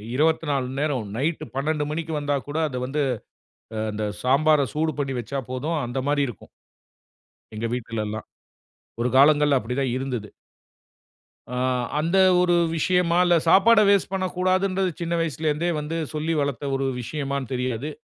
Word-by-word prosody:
24 150 Hz, -2 st, +1 dB
மண் 130 Hz, +2 st, -6 dB
நேரம், 140 Hz, -7 st, -1 dB
நைட்டு 155 Hz, +5 st, -1 dB
12 150 Hz, +2 st, 0 dB
மணிக்கு 160 Hz, +1 st, -3 dB
வந்தா 145 Hz, 0 st, 0 dB
கூட 145 Hz, +2 st, -4 dB
அத 130 Hz, -4 st, -5 dB
வந்து 145 Hz, +4 st, -1 dB, 0.8 s
ஆ -, -, -2 dB
அந்த 105 Hz, 0 st, -3 dB, 0.2 s
சாம்பார 150 Hz, +4 st, +4 dB
சூடு 155 Hz, +1 st, 0 dB
பண்ணி 135 Hz, -1 st, -1 dB
வச்சா 120 Hz, +4 st, -4 dB
போதும். 150 Hz, +6 st, -2 dB
அந்த 120 Hz, +2 st, -4 dB
மாரி 145 Hz, 0 st, +2 dB
இருக்கும். 120 Hz, -6 st, -9 dB, 1.1 s
எங்க 110 Hz, +2 st, -3 dB
வீட்டுலலாம். 110 Hz, -3 st, -4 dB, 0.7 s
ஒரு 120 Hz, -, +1 dB
காலங்கள்ல 145 Hz, 0 st, +5 dB
அப்படி 115 Hz, +4 st, -4 dB
தான் 130 Hz, -3 st, 0 dB
இருந்தது. 130 Hz, -5 st, -3 dB, 1.3 s
ஆ, -, -, -2 dB, 0.4 s
அந்த 165 Hz, +5 st, +1 dB, 0.2 s
ஒரு 175 Hz, -1 st, +3 dB, 0.2 s
விஷயமா 175 Hz, +1 st, +2 dB
இல்ல 175 Hz, -1 st, +4 dB
சாப்பாட 215 Hz, +6 st, +6 dB
வேஸ்ட் 200 Hz, -2 st, +3 dB
பண்ணக்கூடாதுன்றது, 185 Hz, 0 st, 0 dB
சின்ன 170 Hz, 0 st, -2 dB
வயசுலருந்தே 160 Hz, +1 st, -1 dB
வந்து 150 Hz, +2 st, -4 dB, 0.2 s
சொல்லி 155 Hz, +2 st, -1 dB
வளத்த 140 Hz, -1 st, -2 dB
ஒரு 135 Hz, 0 st, -1 dB, 0.2 s
விஷயமான்னு 140 Hz, 0 st, -4 dB
தெரியாது. 125 Hz, +2 st, -2 dB
145 Hz, 145 wpm, -24 LUFS, 130-165 Hz, 1.3 s, சாப்பாட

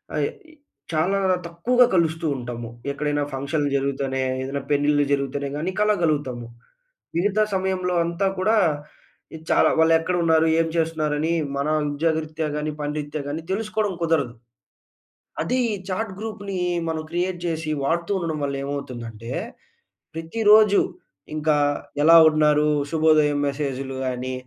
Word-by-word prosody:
అయ్ 145 Hz, -2 st, +1 dB, 0.6 s
చాలా 185 Hz, +6 st, +1 dB, 0.3 s
తక్కువగా 245 Hz, +9 st, +3 dB
కలుస్తూ 165 Hz, -1 st, +1 dB
ఉంటాము. 120 Hz, -1 st, -6 dB, 0.2 s
ఎక్కడైనా 145 Hz, 0 st, -1 dB
ఫంక్షన్‌లు 145 Hz, +2 st, -1 dB
జరుగుతేనే, 135 Hz, -1 st, -2 dB, 0.2 s
ఏదైనా 140 Hz, +1 st, -3 dB
పెళ్ళిళ్ళు 145 Hz, 0 st, +3 dB
జరుగుతేనే, 140 Hz, 0 st, -1 dB
గాని 175 Hz, +5 st, -2 dB
కలవగలుగుతాము. 155 Hz, -, +1 dB, 0.7 s
మిగతా 205 Hz, +4 st, +2 dB
సమయంలో 185 Hz, -1 st, -1 dB
అంతా 170 Hz, +4 st, -1 dB
కూడా 215 Hz, +4 st, +2 dB, 0.9 s
చాలా -, -, +5 dB
వాళ్ళు 160 Hz, 0 st, +5 dB
ఎక్కడ 180 Hz, +2 st, -1 dB
ఉన్నారు? 160 Hz, 0 st, +4 dB
ఏం 165 Hz, -, +2 dB
చేస్తున్నారు 160 Hz, -2 st, 0 dB
అని 165 Hz, +2 st, 0 dB, 0.2 s
మన 140 Hz, +1 st, -1 dB, 0.3 s
ఉద్యోగరీత్యా 155 Hz, 0 st, -1 dB
గాని, 150 Hz, 0 st, -2 dB
పని 145 Hz, 0 st, -2 dB
రీత్యా 145 Hz, 0 st, -5 dB
గాని 155 Hz, +3 st, -4 dB
తెలుసుకోవడం 215 Hz, -1 st, -1 dB
కుదరదు. 150 Hz, -7 st, +1 dB, 1.1 s
అదే 250 Hz, +10 st, -1 dB, 0.2 s
ఈ -, -, -1 dB, 0.2 s
చాట్ 200 Hz, +1 st, -2 dB
గ్రూప్‌ని 200 Hz, -3 st, -5 dB, 0.3 s
మనం 160 Hz, -1 st, -2 dB
క్రియేట్ 175 Hz, +1 st, -1 dB
చేసి 160 Hz, -2 st, -2 dB
వాడుతూ 170 Hz, +5 st, -1 dB
ఉండడం 160 Hz, -3 st, -3 dB
వల్ల 140 Hz, 0 st, -2 dB
ఏమవుతుందంటే, 120 Hz, -5 st, -6 dB, 0.9 s
ప్రతిరోజు 210 Hz, +4 st, +4 dB, 0.5 s
ఇంకా 155 Hz, -1 st, +2 dB, 0.5 s
ఎలా 165 Hz, +2 st, +8 dB
ఉన్నారు? 150 Hz, -1 st, +3 dB, 0.2 s
శుభోదయం 155 Hz, -2 st, +3 dB
మెసేజ్‌లు 135 Hz, -2 st, -4 dB
గాని 130 Hz, +1 st, -3 dB
155 Hz, 125 wpm, -23 LUFS, 145-175 Hz, 1.1 s, ఎలా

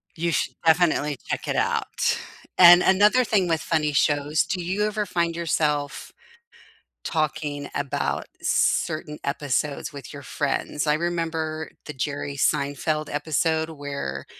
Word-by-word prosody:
You 170 Hz, +1 st, -1 dB
should -, -, -1 dB
definitely 160 Hz, -4 st, +3 dB
check -, -, -3 dB
it -, -, -1 dB
out. -, -, 0 dB, 0.4 s
And 175 Hz, 0 st, +9 dB
another 210 Hz, +6 st, +4 dB
thing 200 Hz, -5 st, +1 dB
with 165 Hz, -2 st, 0 dB
funny 150 Hz, -3 st, 0 dB
shows 145 Hz, +2 st, +2 dB
do 185 Hz, -2 st, -3 dB
you 190 Hz, +4 st, -1 dB
ever 210 Hz, 0 st, -1 dB
find 170 Hz, -2 st, -1 dB
yourself 150 Hz, -3 st, -1 dB, 0.9 s
talking 150 Hz, -2 st, -2 dB
about 140 Hz, -1 st, -2 dB, 0.2 s
certain 155 Hz, -1 st, 0 dB
episodes 140 Hz, +1 st, -2 dB
with 140 Hz, -, -9 dB
your 140 Hz, -1 st, -9 dB
friends? 145 Hz, +3 st, -2 dB
I 150 Hz, -, +4 dB
remember 160 Hz, -2 st, -2 dB
the 150 Hz, -, -6 dB
Jerry 145 Hz, +1 st, -3 dB
Seinfeld 145 Hz, +3 st, 0 dB
episode 160 Hz, +2 st, 0 dB
where 140 Hz, -, -5 dB
155 Hz, 130 wpm, -24 LUFS, 145-170 Hz, 0.9 s, And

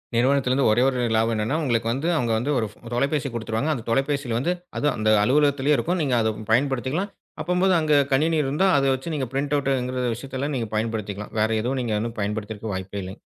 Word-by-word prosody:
நிறுவனத்துலருந்து 130 Hz, +1 st, +3 dB
ஒரே 120 Hz, +3 st, +3 dB
ஒரு 130 Hz, -2 st, 0 dB
லாபம் 115 Hz, +1 st, +2 dB
என்னன்னா, 110 Hz, +8 st, 0 dB
உங்களுக்கு 115 Hz, -4 st, 0 dB
வந்து 135 Hz, +7 st, -2 dB
அவுங்க 120 Hz, -7 st, 0 dB
வந்து 130 Hz, +6 st, -1 dB
ஒரு 110 Hz, -, 0 dB
ஃப் -, -, -21 dB, 0.2 s
தொலைபேசி 140 Hz, +3 st, 0 dB
குடுத்துருவாங்க. 115 Hz, +4 st, -2 dB
அந்த 120 Hz, -6 st, -5 dB
தொலைபேசியில 135 Hz, -1 st, 0 dB
வந்து 170 Hz, +8 st, 0 dB, 0.2 s
அதுவும் 145 Hz, -3 st, +1 dB
அந்த 110 Hz, 0 st, +1 dB
அலுவலகத்திலேயே 145 Hz, +3 st, +3 dB
இருக்கும். 175 Hz, +1 st, -1 dB
நீங்க 135 Hz, -5 st, +1 dB
அதப் 110 Hz, -1 st, -1 dB
பயன்படுத்திக்கலாம். 135 Hz, -, +1 dB, 0.3 s
அப்பம்போது 180 Hz, +2 st, +2 dB
அங்க 155 Hz, -1 st, +1 dB, 0.2 s
கணினி 160 Hz, +4 st, +2 dB
இருந்தா, 145 Hz, +8 st, +1 dB
அத 135 Hz, -, +2 dB
வச்சு 145 Hz, +6 st, -6 dB
நீங்க 135 Hz, -3 st, -2 dB
பிரிண்ட் 140 Hz, +2 st, 0 dB
அவுட்ங்கிற 130 Hz, -2 st, -1 dB
விஷயத்தல்லாம் 135 Hz, +4 st, -4 dB
நீங்கப் 115 Hz, -3 st, -4 dB
பயன்படுத்திக்கலாம். 105 Hz, -2 st, -3 dB
வேற 110 Hz, -, +2 dB
எதுவும் 130 Hz, +3 st, -1 dB
நீங்க 115 Hz, -3 st, -2 dB
வந்து 115 Hz, +1 st, -4 dB
பயன்படுத்தறதுக்கு 105 Hz, +1 st, -4 dB
வாய்ப்பே 95 Hz, +2 st, -5 dB
இல்லைங்க. 95 Hz, +4 st, -9 dB
130 Hz, 190 wpm, -24 LUFS, 115-145 Hz, 0.3 s, நிறுவனத்துலருந்து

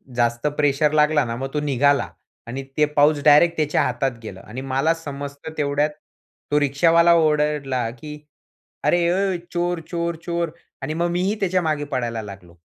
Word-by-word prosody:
जास्त 120 Hz, +3 st, +1 dB
प्रेशर 145 Hz, +1 st, +2 dB
लागला 150 Hz, -2 st, +3 dB
ना 115 Hz, 0 st, -4 dB
मग 135 Hz, +3 st, -5 dB
तो 150 Hz, -, 0 dB
निघाला. 140 Hz, 0 st, +2 dB, 0.4 s
आणि 135 Hz, +3 st, -5 dB
ते 150 Hz, -, +5 dB
पाउच 145 Hz, 0 st, +4 dB
डायरेक्ट 160 Hz, +3 st, +6 dB
त्याच्या 150 Hz, -1 st, +1 dB
हातात 130 Hz, -3 st, -1 dB
गेलं. 95 Hz, -3 st, -8 dB
आणि 125 Hz, +5 st, -8 dB
मला 145 Hz, +5 st, +2 dB
समजतं 145 Hz, -1 st, -8 dB
तेवढ्यात 145 Hz, +1 st, +1 dB, 0.6 s
तो 150 Hz, -, +4 dB
रिक्षावाला 165 Hz, +4 st, +4 dB
ओरडला 150 Hz, -6 st, +1 dB
की, 150 Hz, -1 st, -8 dB, 0.7 s
"अरे 170 Hz, -1 st, +2 dB
ओय, 190 Hz, -1 st, 0 dB, 0.2 s
चोर! 175 Hz, 0 st, -1 dB
चोर! 170 Hz, -1 st, -2 dB
चोर!" 170 Hz, -2 st, -2 dB, 0.3 s
आणि 155 Hz, -, -3 dB
मग 170 Hz, +1 st, 0 dB
मीही 185 Hz, +4 st, 0 dB
त्याच्या 185 Hz, -1 st, +1 dB
मागे 155 Hz, -3 st, -1 dB
पळायला 120 Hz, -3 st, -2 dB
लागलो. 95 Hz, -4 st, -11 dB
150 Hz, 160 wpm, -22 LUFS, 135-165 Hz, 0.7 s, डायरेक्ट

